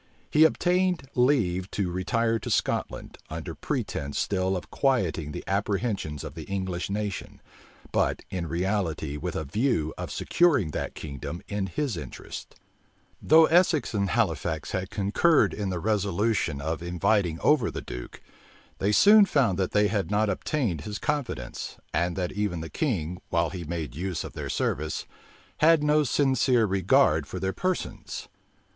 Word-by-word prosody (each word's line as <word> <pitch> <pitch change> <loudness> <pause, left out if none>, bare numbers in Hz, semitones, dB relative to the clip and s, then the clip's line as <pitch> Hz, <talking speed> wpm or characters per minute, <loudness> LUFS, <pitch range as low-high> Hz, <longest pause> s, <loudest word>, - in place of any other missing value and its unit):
He 155 +1 +6
obtained 180 -2 +1
leave 110 -9 +2
to 95 -4 0
retire 115 +5 0
to - - -6
Scotland, - - -1
under - - -5
pretence 70 0 -3
still 95 -1 0
of 90 - -9
quieting 90 - 0
the - - -6
apprehensions 100 - -1
of - - -7
the - - -8
English 95 -3 -3
nation; 100 0 -4 0.5
but - - +1
in 90 -3 -3
reality 85 -4 -1
with 85 +3 -4
a 80 - -1
view 80 - 0
of - - -4
securing 145 - +2
that - - -4
kingdom 75 +3 -6
in 100 -2 -2
his 110 - -2
interests. 75 -6 -8 0.7
Though 160 +2 +7
Essex 170 -4 +3
and 100 -2 0
Halifax 80 -4 0
had 95 -1 -2
concurred 105 - +3
in 100 -2 -3
the 90 - -2
resolution 100 -3 0
of 80 +3 -2
inviting 90 0 +1
over 145 -7 +3
the - - -6
duke, - - -8 0.6
they 100 - +1
soon 205 - +7
found 125 - +2
that 95 - +1
they 105 0 +3
had 100 -2 -1
not 105 0 +2
obtained 100 - -1
his 105 +5 -5
confidence, 135 - -3 0.2
and 85 +1 0
that 90 -2 -2
even 100 -5 -2
the 80 - -6
king, 90 - -2
while 85 -1 +1
he 90 -3 -6
made 80 -5 -4
use 90 +1 -3
of - - -8
their - - -5
service, 75 +2 -1 0.5
had 160 -1 +5
no 150 0 +4
sincere 130 -3 +3
regard 95 - +3
for 95 - -5
their 95 +1 -1
persons. 185 -1 -3
100 Hz, 155 wpm, -27 LUFS, 85-125 Hz, 0.7 s, Though